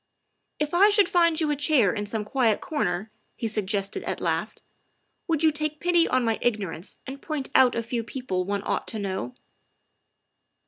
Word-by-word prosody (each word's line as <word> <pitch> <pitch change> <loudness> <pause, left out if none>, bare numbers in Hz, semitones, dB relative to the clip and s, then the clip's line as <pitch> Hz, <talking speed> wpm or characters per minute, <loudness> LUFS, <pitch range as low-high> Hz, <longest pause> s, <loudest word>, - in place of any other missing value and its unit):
" - - -51
If 300 +1 -1
I 390 +4 +6
should 410 -3 +4
find 335 -2 +3
you 310 -2 +1
a - - +1
chair 285 - +3
in 205 -1 -3
some 210 0 -3
quiet 230 -2 +1
corner," 215 - -2 0.2
he 230 - -3
suggested 200 -2 -1
at - - -4
last, - - -2 0.3
" - - -48
would 325 -2 0
you 315 - +5
take 305 0 -2
pity 345 -1 +3
on 255 -1 +1
my 225 -1 0
igno 210 -6 0
rance 165 +3 -9
and 270 +1 -8
point 300 -4 -4
out 260 -2 +5
a 230 - -1
few 230 0 -3
people 225 -6 -3
one 200 +1 -3
ought - - -2
to 220 - -1
know?" 190 - -4
245 Hz, 195 wpm, -26 LUFS, 205-305 Hz, 0.3 s, I